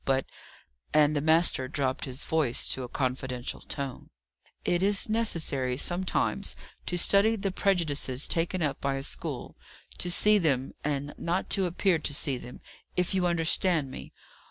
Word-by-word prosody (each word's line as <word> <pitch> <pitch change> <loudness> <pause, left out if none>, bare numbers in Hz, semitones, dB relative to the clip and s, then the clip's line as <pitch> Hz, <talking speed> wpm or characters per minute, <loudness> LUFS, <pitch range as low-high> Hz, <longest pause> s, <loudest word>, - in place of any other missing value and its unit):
But," 135 -1 +1 0.7
and 150 0 +5
the 145 - +1
master 160 -4 +4
dropped 130 +1 -1
his 130 0 -3
voice 155 -7 +1
to 130 - 0
a 125 - -4
confidential 130 -1 -2
tone, 140 -3 -5 0.6
"it 175 0 +2
is 200 +1 +3
necessary 160 - 0
sometimes 180 +5 0 0.3
to 180 - 0
study 200 +5 +4
the 195 -2 -2
prejudices 155 -9 0
taken 170 +1 0
up 145 -3 -1
by 140 -1 0
a 135 - -4
school; - - -4 0.4
to 180 - -2
see 210 +4 +4
them, 135 -6 0
and 145 0 -2
not 175 +3 -1
to 190 -2 +3
appear 175 0 +2
to 145 -2 -2
see 135 -3 0
them 125 - -10 0.3
if 180 +1 0
you 185 -2 +2
understand 165 -3 +1
me. - - -8
155 Hz, 155 wpm, -28 LUFS, 135-180 Hz, 0.7 s, and